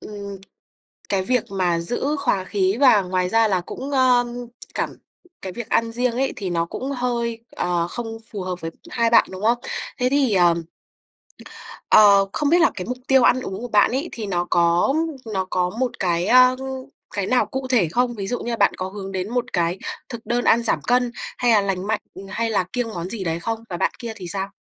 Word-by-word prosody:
ừm, 200 -1 -8 0.7
cái 195 -2 +1
việc 250 +4 +1
mà 180 -3 +1
giữ 265 - -1
hòa 205 -9 0
khí 190 +1 0
và 225 -8 +6
ngoài 180 0 -1
ra 225 +1 +3
là 185 -2 +1
cũng, 265 +10 -7
ơ, 255 -2 +4 0.5
cảm - - -1 0.5
cái 190 -1 -5
việc 235 0 -6
ăn 230 0 +1
riêng 245 0 0
ấy 265 +3 0
thì 195 -3 -4
nó 170 -1 0
cũng 265 +10 -5
hơi, 235 -2 -2 0.2
ờ, 175 -1 0
không 225 +2 -5
phù 200 -3 -4
hợp 185 -1 -3
với 165 0 -4 0.2
hai 235 -1 +1
bạn, 230 - +6
đúng 190 +2 -8
không? 235 +2 +3 0.4
Thế 250 0 +2
thì, 270 -6 +2
ờm, 170 -2 +3 1.3
ờ, 200 -2 +7
không 290 -1 +1
biết 345 +1 +5
là 330 - +5
cái 180 - -5
mục 250 - -3
tiêu 265 -2 +5
ăn 255 - +4
uống 195 -2 -5
của 245 - -4
bạn 210 -3 +4
ấy 275 +7 -2
thì 225 - -5
nó 175 -2 -1
có 170 +8 +3 0.4
nó 190 -1 0
có 180 -1 +1
một 255 -2 +1
cái, 175 -2 +1
a, 255 +1 +6 0.6
cái 200 -2 -1
nào 255 - +3
cụ 265 0 -5
thể 215 -11 +3
không? 245 +2 +1
Ví 195 -2 -4
dụ 245 - -1
như 240 - -4
là - - 0
bạn 200 - +3
có 185 +1 -3
hướng 195 -1 -7
đến 190 +1 -3
một 245 -1 -2
cái 175 +1 0 0.3
thực 235 -2 -7
đơn 240 +2 0
ăn 235 +1 +4
giảm 230 - +1
cân, 245 -1 +1 0.3
hay 245 -1 +2
là 210 -2 +5
lành 195 0 -2
mạnh, 220 -1 0 0.3
hay 225 +3 -1
là 200 -4 +1
kiêng 245 -2 -1
món 175 -2 -5
gì 205 -4 -4
đấy 165 -1 -1
không 225 +4 -4
và 175 - -4
bạn - - +1
kia 235 -2 -5
thì 185 -4 -8
sao? 195 +2 -3
215 Hz, 220 wpm, -22 LUFS, 185-245 Hz, 1.3 s, ờ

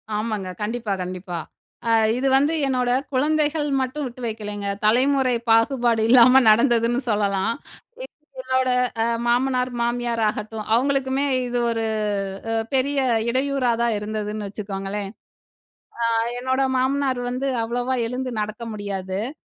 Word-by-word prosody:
ஆமாங்க. 210 -3 -2
கண்டிப்பா, 225 0 -3
கண்டிப்பா. 180 -1 -6 0.5
அ - - +2 0.3
இது 270 - 0
வந்து 290 +4 +2
என்னோட 250 -2 +1 0.2
குழந்தைகள் 300 +2 +1
மட்டும் 270 +3 -3
விட்டு 250 0 -8
வைக்கலேங்க. 210 -2 -4 0.2
தலைமுறை 255 +3 +3 0.2
பாகுபாடு 230 0 +3
இல்லாம 255 +2 +7
நடந்ததுன்னு 235 +1 +3
சொல்லலாம். 200 -1 +1 0.5
எ - - -5 0.4
என்னோட 260 0 +1 0.3
அ - - +1 0.2
மாமனார், 250 +1 +1
மாமியார் 240 -1 -1
ஆகட்டும், 215 +1 -5
அவுங்களுக்குமே 270 +2 +1 0.2
இது 245 0 -1
ஒரு 225 -1 -1 0.7
அ - - 0 0.2
பெரிய 280 +2 +1 0.3
இடையூறா 260 0 +1
தான் 235 -1 +2
இருந்ததுன்னு 210 0 -4
வச்சுக்கோங்களேன். 200 0 -5 1.1
அ - - +2 0.2
என்னோட 260 +2 0
மாமனார் 265 0 0
வந்து 265 +2 -2
அவ்வளவா 245 +3 -1
எழுந்து 255 +1 -4
நடக்க 210 +2 -5
முடியாது. 195 -2 -4
அ - - -6
240 Hz, 125 wpm, -23 LUFS, 215-260 Hz, 1.1 s, இல்லாம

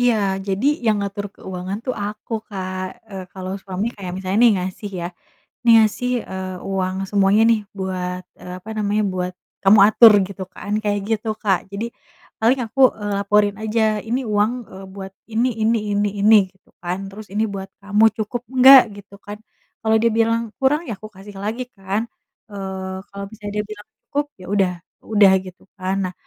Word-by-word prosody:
Iya 245 -1 +4 0.3
jadi 195 +6 0 0.2
yang 215 -1 +4
ngatur 200 0 -3
keuangan 185 +2 -5
tuh 255 - -1
aku 210 +3 -7 0.2
Kak, 185 -2 -4 0.3
eee, 190 -2 -6
kalo 185 -1 -7
suami 190 +2 -3
kayak 185 -3 -6
misalnya 190 +2 -1
nih 235 - +7
ngasih 190 +3 -5
ya, 170 - -3 0.6
nih 235 - +7
ngasih, 225 +3 +2 0.2
eee, 185 -1 -5
uang 185 -1 -1
semuanya 200 +1 +4
nih 225 -2 +4 0.2
buat, 185 -1 -3 0.2
eee, 180 - -8
apa 210 - -12
namanya 210 0 +1
buat 180 0 -2 0.3
kamu 200 +2 +7
atur 225 +1 +8 0.2
gitu 195 -1 -7
kan 205 - -7
kayak 205 -1 0
gitu 220 0 -1
Kak 195 -3 +3
jadi, 200 +3 -3 0.6
paling 250 +4 +3
aku, 245 +5 -9 0.2
eee, 205 0 -3
laporin 205 0 +2
aja 220 +1 0 0.3
ini 240 +3 0
uang, 210 0 +2 0.2
eee, 190 +1 -10
buat 195 -1 -8 0.2
ini 235 +3 +2
ini 225 +2 +3 0.2
ini 205 +1 +2
ini 215 +2 +6 0.2
gitu - - -33
kan 175 +1 -2
terus 210 +2 -10
ini 215 +2 +1
buat 195 0 -6
kamu 205 +2 +2
cukup 220 +2 -3 0.2
nggak 265 +1 +10 0.2
gitu 200 0 -14
kan, 205 0 -7 0.5
kalau 220 0 +4
dia 230 - +4
bilang 230 0 +3 0.2
kurang 285 +4 +2
ya 225 - -2
aku 215 - -11
kasih 200 +1 -12
lagi 225 +4 -2
kan, 195 +2 -2 0.5
eee, 190 -2 -5 0.2
kalo 200 - -6
misalnya 205 -1 -8
dia 210 - -9
bilang 210 0 -10 0.2
cukup 290 +1 0 0.2
ya - - -9
udah 190 -3 +2 0.3
udah 205 -3 +4
gitu 185 +1 -12 0.2
kan. 185 +1 -1 0.2
Nah, - - -23
205 Hz, 180 wpm, -21 LUFS, 190-220 Hz, 0.6 s, nggak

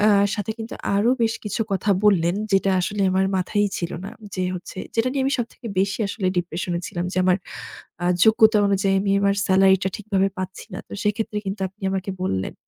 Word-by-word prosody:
অ্যা 210 +1 +5 0.2
সাথে 205 -1 -3
কিন্তু 225 +1 -6 0.2
আরো 220 +5 +3
বেশ 225 0 +2
কিছু 210 +2 -3
কথা 195 +2 0
বললেন 175 -4 +4 0.2
যেটা 195 0 +3
আসলে 200 +3 -1
আমার 190 +1 +2
মাথায়ই 205 +3 +1
ছিল 170 - -3
না। - - -6 0.2
যে 185 - -2
হচ্ছে, 180 +1 -8 0.2
যেটা 230 +2 +2
নিয়ে 275 -1 0
আমি 275 - +1
সবথেকে 235 +1 -5
বেশি 195 +2 0
আসলে 195 -1 -3
ডিপ্রেশন 175 +1 -3
এ - - -5
ছিলাম 175 0 -4
যে, - - -7
আমার 185 0 +4 0.7
আ - - 0 0.2
যোগ্যতা 220 0 +5
অনুযায়ী 195 0 +2
আমি 195 0 0
আমার 200 0 +3
সেলারিটা 190 0 +4
ঠিকভাবে 195 -2 +1
পাচ্ছি 185 0 -6
না। 185 - -5
তো - - -10
সেক্ষেত্রে 210 0 -1
কিন্তু 195 +1 -4
আপনি 195 +1 -18
আমাকে 190 0 -2
বললেন 95 - -2
195 Hz, 200 wpm, -23 LUFS, 185-210 Hz, 0.7 s, অ্যা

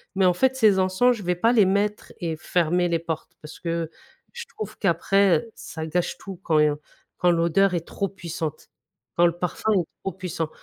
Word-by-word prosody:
Mais 190 0 +3
en 180 - +5
fait, 260 +8 +2
ces 215 -6 +4
encens 190 +7 +3
je 205 - -8
vais 180 0 0
pas 225 +7 +3
les 215 -5 +5
mettre 205 +2 0
et 165 -3 -2
fermer 175 +1 +1
les 165 -1 +1
portes, 160 -2 -5
parce 150 +1 -11
que 165 -1 -2 0.4
je 475 -1 -7
trouve 215 - -6
qu'après, 195 0 +3
heu, 230 - -11
ça 160 -1 -7
gâche 175 +2 -1
tout 190 -3 -9
quand 155 -2 +2 0.6
quand 180 -1 +3
l'odeur 170 +3 +3
est 170 -2 -2
trop 200 - -2
puissante, 165 -4 -6 0.5
quand 175 - +5
le 170 -1 +2
parfum 180 +5 -1
est 185 -4 +2 0.2
trop 195 - -2
puissant. 175 -3 -4
180 Hz, 200 wpm, -24 LUFS, 165-195 Hz, 0.6 s, en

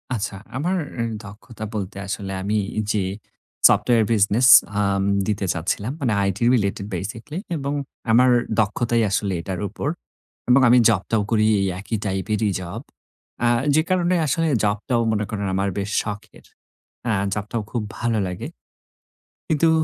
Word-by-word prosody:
আচ্ছা 105 -2 -3 0.2
আমার 180 +7 0 0.2
এ - - +1 0.2
দক্ষতা 105 +2 -10
বলতে 100 -1 -4
আসলে 95 0 -4
আমি 105 +3 0 0.3
যে 105 -3 0 0.6
সফটওয়্যার 115 -3 +3
বিজনেস 110 +4 +3 0.3
আম 100 -1 +1 0.2
দিতে 105 -2 -1
চাচ্ছিলাম। 95 +7 -2
মানে 120 -5 +1
আইটি 100 +1 -1
রিলেটেড 100 -3 -1
বেসিকলি 110 - -6 0.2
এবং 140 0 -3 0.4
আমার 125 +3 +5 0.3
দক্ষতাই 115 +2 +1
আসলে 100 -1 0
এটার 90 +1 -5
উপর। - - -5 0.6
এবং 125 +2 +6
আমি 125 - +6
জবটাও 110 +1 +1
করি 110 -1 +3 0.2
এই 95 - +1
একই 110 +3 -3
টাইপেরই 105 +2 -1
জব। 90 -1 -6 0.6
অ্যা 120 - +3 0.3
যে 155 - +5
কারণে 180 -1 +2
আসলে 165 +4 +1 0.2
জবটাও 110 +3 0
মনে 105 -1 0
করেন 100 -2 -3
আমার 100 +1 0
বেশ 100 +1 -3
শখের। 105 -1 -8 0.6
আ - - +2 0.2
জবটাও 105 +2 -3
খুব 120 - -1 0.2
ভালো 120 -2 0
লাগে। 90 -1 -5 1.0
কিন্তু 160 +1 +3
105 Hz, 140 wpm, -22 LUFS, 100-120 Hz, 1.0 s, এবং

